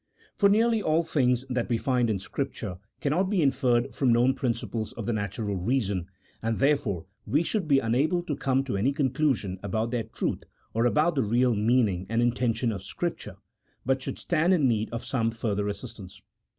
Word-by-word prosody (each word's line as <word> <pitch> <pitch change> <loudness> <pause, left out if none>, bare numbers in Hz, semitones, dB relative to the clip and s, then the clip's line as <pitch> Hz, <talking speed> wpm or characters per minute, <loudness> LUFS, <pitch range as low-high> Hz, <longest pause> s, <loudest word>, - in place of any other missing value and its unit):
For 200 - +4
nearly 225 +2 +3
all 160 -1 +2
things 130 -6 +1
that 125 -2 -2
we 120 - +2
find 125 -1 +1
in 105 - +1
Scripture 100 -3 -4 0.2
cannot 175 +7 +1
be 195 -5 +2
inferred 130 -2 +2
from 130 -3 +2
known 120 +3 +4
principles 115 -3 -3
of 115 - -6
the 120 - 0
natural 100 0 -2
reason, 100 -3 -1 0.3
and, 115 0 -1
therefore, 135 - +1 0.2
we 145 +10 +2
should 190 -1 -1
be 140 -2 +5
unable 140 +9 +1
to 155 -4 -3
come 135 0 +1
to 130 -7 -3
any 125 +8 +1
conclusion 130 - 0
about 110 +3 -2
their 120 -3 -1
truth, - - -3 0.3
or 115 +2 +2
about 155 +7 +2
the 140 - +1
real 120 +3 +2
meaning 105 -4 +1
and 115 +1 0
intention 120 -1 +1
of 100 -3 -5
Scripture, 100 - -4 0.5
but 130 +1 +1
should - - -4
stand 175 +2 +2
in 150 -6 +3
need 110 -2 0
of 115 0 -5
some 115 -4 0
further 105 -3 -2
assistance. 105 - -7
125 Hz, 185 wpm, -27 LUFS, 110-140 Hz, 0.5 s, be